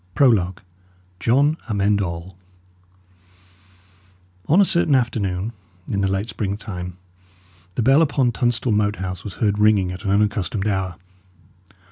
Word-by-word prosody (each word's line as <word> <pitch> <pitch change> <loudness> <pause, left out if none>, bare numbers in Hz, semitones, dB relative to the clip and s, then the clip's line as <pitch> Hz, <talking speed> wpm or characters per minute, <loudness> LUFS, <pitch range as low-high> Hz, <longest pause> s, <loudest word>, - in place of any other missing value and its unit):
PROLOGUE 100 -8 +3 0.6
JOHN 140 +9 +3
AMEND 100 -1 +1
ALL 85 0 -5 2.1
On 165 +6 +4
a 200 - +6
certain 170 -5 +2
afternoon, 110 -4 -1 0.3
in 100 - -1
the 95 - +1
late 95 +3 -1
springtime, 95 -5 -5 0.8
the 120 - 0
bell 135 +6 +5
upon 135 -5 +2
Tunstall 120 -1 0
Moat 105 0 +1
House 95 -2 -5
was 100 - -7
heard 105 -2 0
ringing 105 -4 +3
at 95 +2 -8
an 100 - -2
unaccustomed 100 -1 0
hour. 95 -3 -1
105 Hz, 125 wpm, -21 LUFS, 95-120 Hz, 2.1 s, a